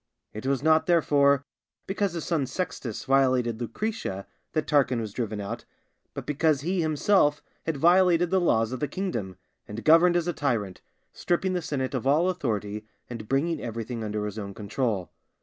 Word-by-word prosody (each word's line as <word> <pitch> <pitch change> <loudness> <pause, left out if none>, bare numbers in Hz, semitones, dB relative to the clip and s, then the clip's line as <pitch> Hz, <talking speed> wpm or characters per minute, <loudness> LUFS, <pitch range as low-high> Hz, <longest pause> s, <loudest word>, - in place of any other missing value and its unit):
It 110 +5 -6
was 135 -1 0
not, 160 0 +4
therefore, 140 -5 +3 0.4
because 195 -1 -1
his 170 -3 -4
son 155 -6 0
Sextus 130 - -4
violated 130 -4 +2
Lucretia 115 - -3 0.3
that 155 - 0
Tarquin 130 -4 +2
was 110 -3 -5
driven 110 -4 -3
out, 100 -1 -5 0.5
but - - -5
because 150 -1 +1
he 180 +4 0
himself 155 -1 +2 0.2
had 160 -3 -1
violated 175 +2 +4
the 190 -1 +3
laws 115 -9 +2
of 130 - -4
the 150 - -1
kingdom, 115 - -4 0.3
and 105 +2 -7
governed 165 +3 +6
as 175 -1 +1
a 175 - 0
tyrant, 115 - -2 0.3
stripping 185 +2 0
the 180 - -1
senate 140 -4 -3
of 130 0 -2
all 160 +6 +4
authority, 105 - -3 0.2
and 110 -3 -7
bringing 155 +5 0
everything 115 0 -4
under 105 -1 -2
his 105 +1 -5
own 100 -2 -6
control. 105 -2 -2
135 Hz, 170 wpm, -26 LUFS, 110-165 Hz, 0.5 s, governed